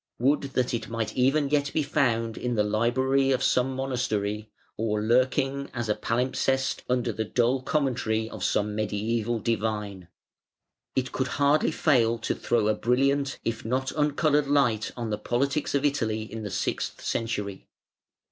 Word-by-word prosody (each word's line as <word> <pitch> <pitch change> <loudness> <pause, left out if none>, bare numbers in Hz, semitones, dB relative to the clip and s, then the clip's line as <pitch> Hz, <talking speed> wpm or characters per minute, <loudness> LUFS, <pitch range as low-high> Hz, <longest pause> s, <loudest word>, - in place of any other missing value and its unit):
Would 135 +5 +2 0.2
that 125 -1 +1
it 115 -1 -3
might 115 -2 -3
even 135 +3 +2
yet 145 -1 +1
be 155 - +1
found 115 -6 +1
in 125 -1 -2
the 105 - +3
library 130 +6 +2
of 130 0 +1
some 130 +1 +2
monastery, 110 -5 -2 0.3
or 105 -1 -1
lurking 130 +5 +1
as 120 -2 -3
a - - +4
palimpsest 130 +2 0
under 125 -1 +1
the 110 +1 -2
dull 120 +4 +1
commentary 125 -6 0
of - - -7
some 105 0 0
mediæval 110 +2 -1
divine! 105 -5 -2 0.9
It 125 -1 0
could 130 - -1
hardly 145 +2 +3
fail 120 -6 +2
to 115 - -2
throw 115 -3 0
a 110 - +3
brilliant, 135 +5 +1
if 115 -1 -2
not 130 +3 -1
uncoloured 150 -1 +2
light 135 -7 +2
on 115 -2 -3
the 105 - -2
politics 140 +7 0
of 140 +1 +1
Italy 110 -7 0
in 110 +1 -7
the 105 - -4
sixth 90 - -2
century. 105 -4 -3
120 Hz, 155 wpm, -27 LUFS, 110-135 Hz, 0.9 s, a